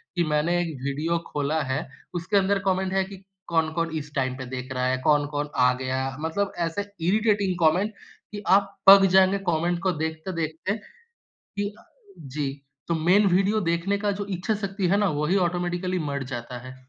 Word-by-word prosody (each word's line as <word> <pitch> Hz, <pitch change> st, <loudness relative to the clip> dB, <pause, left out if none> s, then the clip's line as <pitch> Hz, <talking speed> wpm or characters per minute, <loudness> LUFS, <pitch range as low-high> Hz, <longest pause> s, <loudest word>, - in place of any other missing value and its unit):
कि 175 Hz, -, +2 dB
मैंने 155 Hz, +3 st, +1 dB
एक 175 Hz, -, -1 dB, 0.2 s
वीडियो 155 Hz, +5 st, 0 dB
खोला 150 Hz, +2 st, -1 dB
है 135 Hz, +2 st, -2 dB, 0.3 s
उसके 175 Hz, +4 st, 0 dB
अंदर 200 Hz, +1 st, +2 dB
कॉमेंट 190 Hz, 0 st, +1 dB
है 195 Hz, 0 st, +2 dB
कि 195 Hz, 0 st, -11 dB, 0.2 s
कौन-कौन 165 Hz, 0 st, 0 dB
इस 150 Hz, -1 st, -7 dB
टाइम 130 Hz, -1 st, 0 dB
पे 130 Hz, -, -6 dB
देख 130 Hz, 0 st, -5 dB
रहा 125 Hz, 0 st, -1 dB
है, 130 Hz, 0 st, +1 dB
कौन-कौन 145 Hz, 0 st, +1 dB
आ 125 Hz, 0 st, +4 dB
गया 130 Hz, +1 st, -2 dB
मतलब 165 Hz, +6 st, -1 dB, 0.2 s
ऐसे 165 Hz, +5 st, -3 dB, 0.3 s
इरिटेटिंग 205 Hz, -2 st, +2 dB
कॉमेंट 180 Hz, +6 st, +3 dB, 0.4 s
कि 205 Hz, 0 st, -7 dB
आप 200 Hz, 0 st, -3 dB
पक 195 Hz, 0 st, +10 dB
जाएँगे 190 Hz, +1 st, +5 dB
कॉमेंट 170 Hz, +2 st, 0 dB
को 190 Hz, -, +2 dB
देखते-देखते 160 Hz, +3 st, -3 dB, 0.6 s
कि 205 Hz, 0 st, -5 dB
अ -, -, -19 dB, 0.5 s
जी 150 Hz, -2 st, -1 dB, 0.4 s
तो 170 Hz, -, +1 dB
मेन 180 Hz, +6 st, +4 dB
वीडियो 195 Hz, +4 st, +2 dB
देखने 170 Hz, +4 st, +1 dB
का 205 Hz, 0 st, 0 dB
जो 200 Hz, 0 st, -4 dB
इच्छा 190 Hz, +3 st, -1 dB
शक्ति 200 Hz, -2 st, -2 dB
है 195 Hz, -, +3 dB
ना, 205 Hz, -1 st, +3 dB
वही 150 Hz, +5 st, 0 dB
ऑटोमैटिकली 180 Hz, 0 st, 0 dB
मर 140 Hz, -4 st, -3 dB
जाता 120 Hz, 0 st, -5 dB
है। 130 Hz, -, -9 dB
170 Hz, 180 wpm, -25 LUFS, 150-195 Hz, 0.6 s, पक